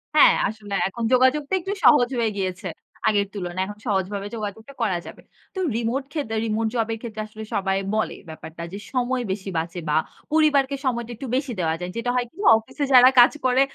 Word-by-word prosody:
হ্যাঁ, 300 - +8
আসলে 210 -1 -7
এখন 230 +4 -6
যোগাযোগটা 270 +5 +3
একটু 390 +3 -3
সহজ 245 -5 +6
হয়ে 225 -2 +1
গিয়েছে 185 -1 -3 0.4
আগের 205 -2 +2
তুলনায়। 185 -2 -3
এখন 205 - -8
সহজভাবে 200 0 -1
যোগাযোগটা 220 +4 -6
করা 190 -6 +1
যাবে। - - -11 0.3
তো 380 - -3 0.2
রিমোট 235 +4 -1
ক্ষেদে 280 -8 -3
remote 220 0 0
job 225 -2 +1
এর - - -4
ক্ষেত্রে 220 -3 -5
আসলে 215 0 -9
সবাই 195 -1 0 0.2
বলে 220 - -1
ব্যাপারটা 160 +1 -9
যে 200 - -5
সময় 250 0 0
বেশি 195 0 -4
বাঁচে 170 +2 -3
বা 150 - +2 0.4
পরিবারকে 290 -3 +3
সময়টা 235 -2 -1
একটু 265 - -7
বেশি 270 -1 -1
দেওয়া 160 -2 +1
যায়। 180 0 -5
যেটা 240 +1 -2
হয় 245 - +1
কি 330 - -28 0.2
অফিসে 225 +6 -5
যারা 255 0 +9
কাজ 245 - +8
করে, 255 +1 +4
225 Hz, 190 wpm, -23 LUFS, 200-255 Hz, 0.4 s, যারা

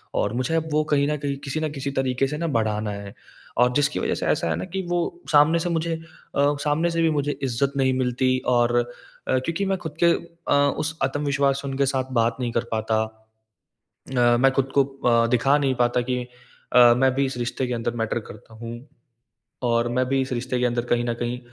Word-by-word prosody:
और 105 - 0
मुझे 130 +6 -1
अब 160 0 0
वो 155 0 +3
कहीं 140 0 +3
न 150 - 0
कहीं, 140 -1 -3
किसी 140 +2 -4
ना 155 -1 -1
किसी 140 -1 -4
तरीके 135 0 0
से 150 +2 -4
ना 170 +2 -2
बढ़ाना 105 -1 -1
है। 100 -1 -7 0.5
और 125 - +3
जिसकी 145 +2 +1
वजह - - 0
से - - -3
ऐसा - - +1
है 80 - +1
ना 90 - -4
कि 190 +2 -4
वो 175 0 +1 0.3
सामने 155 +3 +5
से 175 - -2
मुझे 165 0 -1
अ, 155 -3 -2
सामने 155 +3 +2
से 165 0 0
भी 165 - +4
मुझे 145 -1 -1
इज़्ज़त 135 +2 0
नहीं 130 -1 +2
मिलती 130 0 +1 0.2
और 120 0 +2
अ, - - +2 0.6
क्योंकि 165 +9 -2
मैं 195 0 0
खुद 160 -3 -7
के 170 - +6 0.4
अ, - - +5 0.2
उस 155 +1 -3
आत्मविश्वास 140 0 +1
से 140 - -6
उनके 135 +1 +1
साथ 130 0 -2
बात 115 0 0
नहीं 120 -2 -2
कर 115 - +1
पाता। 110 0 0 1.2
अ, 120 -1 +4
मैं 135 +2 +4
खुद 135 0 0
को 140 - +7
अ, 120 -4 +1
दिखा 125 +4 +3
नहीं 135 -2 +1
पाता 120 0 +2
कि 125 -1 0 0.5
अ, 120 -1 +8
मैं 130 0 +3
भी 140 +1 +2
इस 130 -2 -4
रिश्ते 125 +2 -2
के 125 - -2
अंदर 120 0 -2
मैटर 115 - -1
करता 110 +2 -15
हूँ। 115 +1 -7 0.9
और 120 -1 +2
मैं 130 - +3
भी 135 +1 +1
इस 130 0 -4
रिश्ते 125 +1 -2
के 125 - +1
अंदर 120 0 0
कहीं 120 0 +1
न 120 - 0
कहीं 120 +1 -3
130 Hz, 225 wpm, -24 LUFS, 120-145 Hz, 1.2 s, अ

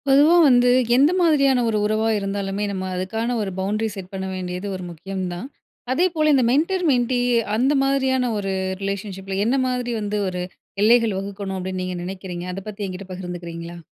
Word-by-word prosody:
பொதுவா 290 +5 +6
வந்து, 245 -1 +5 0.3
எந்த 280 +5 +5
மாதிரியான 275 -7 +4
ஒரு 215 - +1
உறவா 215 +1 +1
இருந்தாலுமே, 195 0 -2
நம்ம 190 -1 -3
அதுக்கான 225 +6 -2
ஒரு 200 -2 -3
பவுண்டரி 210 +3 -1
செட் 190 -2 -8
பண்ண 190 0 -3
வேண்டியது 180 +1 -4
ஒரு 185 - -6
முக்கியம் 190 +3 -5
தான். 180 +9 -6 0.5
அதேபோல 320 -1 +2
இந்த 265 -2 +4
மென்டர், 345 +7 +1
மென்டி 245 -1 +1 0.4
அந்த 265 +5 +3
மாதிரியான 260 -2 +1
ஒரு 195 -1 -2 0.3
ரிலேஷன்ஷிப்பில, 195 -1 -4
என்ன 250 +4 +2
மாதிரி 250 -1 -2
வந்து, 210 0 -2
ஒரு 180 -1 -3 0.4
எல்லைகள் 225 -2 +4
வகுக்கணும், 195 -1 -5
அப்டின்னு 185 0 -4
நீங்க 185 -1 -4
நெனைக்கிறீங்க. 180 -1 -6
அதை 195 +1 -6
பத்தி 210 0 -6
என்கிட்ட 185 +1 -7
பகிர்ந்துக்கிறீங்களா? 175 -2 -7
205 Hz, 165 wpm, -22 LUFS, 190-250 Hz, 0.5 s, பொதுவா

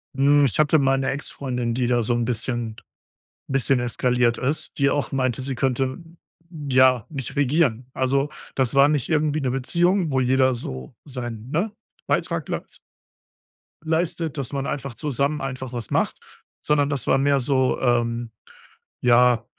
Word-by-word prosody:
Mhm, 140 +1 +4
ich 130 +2 -1
hatte 155 +1 +5
mal 135 -2 +3
'ne 135 0 0
Ex 140 +2 -4
Freundin, 125 -4 -3
die 125 0 0
da 120 -1 +2
so 120 - +1
'n 120 0 0
bisschen 120 -1 -2 0.7
'n - - -6
bisschen 135 -1 +2
eskaliert 120 0 +1
ist, 140 +5 -2
die 140 0 +4
auch 145 0 -1
meinte, 130 -2 0
sie 135 0 -3
könnte, 130 +1 0 0.7
ja, 130 -3 +4
mich 135 -1 -5
regieren. 140 -4 +1
Also, 135 +2 +1 0.3
das 130 -2 0
war 140 +1 +6
nicht 150 -1 0
irgendwie 155 -1 +1
'ne 130 -2 0
Beziehung, 170 +6 +1
wo 130 - +2
jeder 130 +1 +3
so 65 - -7
seinen, 120 -3 -6
ne, 190 +8 0 0.4
Beitrag - - -1
leis - - -6 1.1
leistet, 160 -1 -1
dass 135 0 -4
man 140 0 -2
einfach 135 -2 -4
zusammen 145 +2 -1
einfach 130 -2 -5
was 120 -3 -5
macht, - - 0 0.4
sondern 145 -1 +2
das 140 -3 -3
war - - +4
mehr 140 +1 +3
so, 130 0 +1
ähm, 120 -1 0 0.7
ja, 120 -1 +4
130 Hz, 160 wpm, -23 LUFS, 125-145 Hz, 1.1 s, war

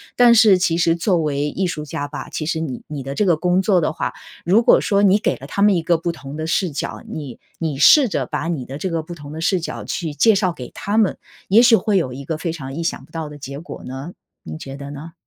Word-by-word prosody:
但 240 -1 +6
是 210 -4 +6
其 170 -2 +1
实 170 -1 +3
作 175 +2 +1
为 150 -2 -1
艺 190 - -2
术 155 -4 -4
家 145 0 -4
吧， 145 - -7
其 155 - -4
实 160 +1 -1
你 140 -6 -5
你 150 -2 -5
的 135 +1 -5
这 210 - +1
个 175 -3 +4
工 180 +2 +2
作 190 -3 +3
的 155 - 0
话， - - -3 0.3
如 195 +7 +4
果 - - +5
说 200 -1 +1
你 200 0 +5
给 - - 0
了 - - -10
他 200 - -3
们 205 -2 +5
一 170 - +1
个 170 +1 +2
不 170 +1 -2
同 145 -4 -9
的 155 - -3
视 175 +3 0
角， 140 - -4
你 140 -6 -7 0.2
你 155 -4 -3
试 275 - +7
着 205 - -2
把 - - -3
你 145 -7 -3
的 135 +3 -7
这 185 - -3
个 165 -1 -1
不 170 +2 -9
同 145 -2 -10
的 160 - -6
视 180 +2 +2
角 165 - -6
去 160 -4 -4
介 220 +8 +4
绍 190 -2 +1
给 125 -6 -8
他 205 +2 -2
们， 210 - +2 0.3
也 210 +5 +6
许 240 -2 +7
会 210 -2 +1
有 130 -9 -1
一 135 +2 -7
个 155 +3 -3
非 165 +1 -3
常 135 -4 -7
意 170 - -3
想 165 - -2
不 - - -20
到 160 -2 -5
的 150 - -10
结 140 0 -7
果 170 - -9
呢， 135 +6 -7 0.3
您 80 0 -8
觉 135 0 -8
得 140 0 -8
呢？ 150 +3 -9
165 Hz, 300 characters per minute, -20 LUFS, 145-185 Hz, 0.3 s, 试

